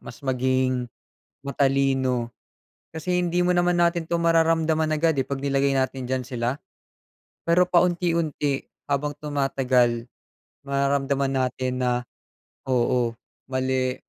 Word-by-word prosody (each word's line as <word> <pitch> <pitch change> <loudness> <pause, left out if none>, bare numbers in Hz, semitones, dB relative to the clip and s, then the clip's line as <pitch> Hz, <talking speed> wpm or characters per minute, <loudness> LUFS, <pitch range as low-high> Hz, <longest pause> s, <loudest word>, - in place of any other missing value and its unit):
mas - - -12
maging 130 -1 0 0.6
matalino. 135 -3 +1 0.6
Kasi 180 +3 -1
hindi 175 0 +1
mo 180 - +2
naman, 175 0 +2
natin 170 -1 +1
'to 170 0 -1
mararamdaman 165 -1 +3
agad, 155 -1 +1
eh, 135 - +1
'pag 140 -1 -4
nilagay 140 0 +1
natin 130 -1 -1
diyan 130 0 -1
sila. 125 +3 -3 0.8
Pero 175 +2 +3
paunti-unti, 170 -5 +1 0.2
habang 145 +1 0
tumatagal, 130 -5 +1 0.6
mararamdaman 140 0 0 0.2
natin 125 0 -3
na, 125 -1 0 0.6
oo, 120 -2 +1 0.3
mali, 130 -1 0
140 Hz, 110 wpm, -24 LUFS, 130-160 Hz, 0.8 s, mararamdaman